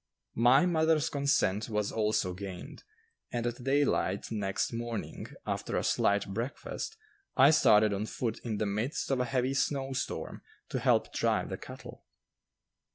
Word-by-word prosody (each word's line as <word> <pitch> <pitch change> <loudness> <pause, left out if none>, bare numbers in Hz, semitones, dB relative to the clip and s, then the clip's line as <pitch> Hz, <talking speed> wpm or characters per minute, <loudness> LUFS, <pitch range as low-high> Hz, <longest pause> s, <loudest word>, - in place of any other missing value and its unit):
My 125 +7 +5
mother's 160 -3 +2
consent 140 -8 +1
was 105 -2 -1
also 105 -4 0
gained, 95 -1 -8 0.5
and 120 -1 -2
at 120 +1 -3
daylight 135 -9 +1
next 100 0 -1
morning, 115 -1 -4 0.2
after - - -2
a - - 0
slight 100 0 +2
breakfast, 130 - -4 0.4
I 140 +3 +8
started 110 -9 +5
on 100 +2 -2
foot 115 -1 -3
in 110 -3 -2
the 110 - 0
midst 110 +9 -2
of 135 - +1
a 125 - +1
heavy 130 +1 0
snow 135 0 0
storm - - -4 0.3
to - - -2
help - - +2
drive - - +1
the - - -4
cattle. - - -10
120 Hz, 150 wpm, -30 LUFS, 105-135 Hz, 0.5 s, I